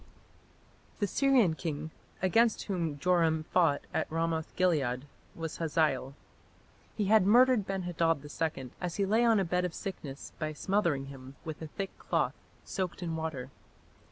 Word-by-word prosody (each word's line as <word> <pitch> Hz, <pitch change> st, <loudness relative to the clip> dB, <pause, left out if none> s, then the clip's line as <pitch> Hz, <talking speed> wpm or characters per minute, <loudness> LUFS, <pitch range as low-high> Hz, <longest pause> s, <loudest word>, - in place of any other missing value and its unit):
The 205 Hz, -, +1 dB
Syrian 250 Hz, -, +3 dB
king 160 Hz, -1 st, -4 dB, 0.3 s
against 225 Hz, +5 st, +3 dB
whom 170 Hz, -7 st, -2 dB
Joram 165 Hz, -1 st, +2 dB
fought 160 Hz, -3 st, +2 dB
at -, -, -1 dB
Ramoth 165 Hz, -1 st, -1 dB
gilead 140 Hz, -8 st, +1 dB, 0.3 s
was 165 Hz, -1 st, -5 dB
Hazael. 150 Hz, -4 st, 0 dB, 0.8 s
He 210 Hz, -, +1 dB
had 215 Hz, 0 st, +5 dB
murdered 245 Hz, -1 st, +5 dB
Ben 195 Hz, -1 st, -2 dB
hadad 165 Hz, -4 st, 0 dB
II 145 Hz, -4 st, -3 dB
as 175 Hz, -2 st, -2 dB
he 200 Hz, -, +1 dB
lay 220 Hz, +4 st, +3 dB
on 225 Hz, -3 st, +5 dB
a 195 Hz, -, +1 dB
bed 180 Hz, +2 st, 0 dB
of 180 Hz, -2 st, -2 dB
sickness 150 Hz, -8 st, -6 dB
by 155 Hz, -1 st, -2 dB
smothering 170 Hz, -5 st, 0 dB
him 135 Hz, -1 st, -10 dB
with 160 Hz, -1 st, -6 dB
a 160 Hz, -, -5 dB
thick 195 Hz, +5 st, -5 dB
cloth -, -, 0 dB, 0.3 s
soaked 185 Hz, -1 st, -3 dB
in 165 Hz, -2 st, -2 dB
water. 155 Hz, -5 st, -4 dB
165 Hz, 155 wpm, -31 LUFS, 155-195 Hz, 0.8 s, had